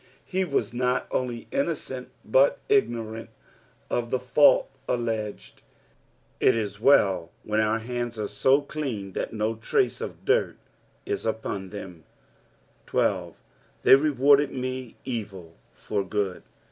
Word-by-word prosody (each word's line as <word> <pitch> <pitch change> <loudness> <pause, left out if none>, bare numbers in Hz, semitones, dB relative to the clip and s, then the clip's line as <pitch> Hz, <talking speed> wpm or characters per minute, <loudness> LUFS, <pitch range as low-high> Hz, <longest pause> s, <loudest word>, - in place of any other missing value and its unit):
He 190 0 0
was 140 -6 -1
not 125 +1 0
only 120 -2 -2
innocent, 275 +1 -2 0.2
but - - +4
igno 120 - +2
rant 115 +1 -8 0.6
of 120 -1 -1
the 130 - +1
fault 125 +4 +4 0.2
alleged. 110 -3 -3 0.8
It - - +4
is 105 -2 -3
well 95 -10 +4
when 105 0 0
our 110 +1 +2
hands 120 0 -4
are 105 -1 -2
so 135 +6 +3
clean 130 -10 -4
that - - -3
no 110 0 -1
trace 115 - 0
of - - -7
dirt 455 +3 +2 0.5
is 405 -1 -2
upon 100 -3 -3
them, 90 -5 -9 0.8
13. - - 0 0.2
" - - -35
Thei/ - - +10
reaarded 140 0 +4
me 130 -2 -5
etU 100 -9 -5 0.2
for 100 -2 -3
gnod."". 95 -1 -2
120 Hz, 135 wpm, -26 LUFS, 105-140 Hz, 0.8 s, Thei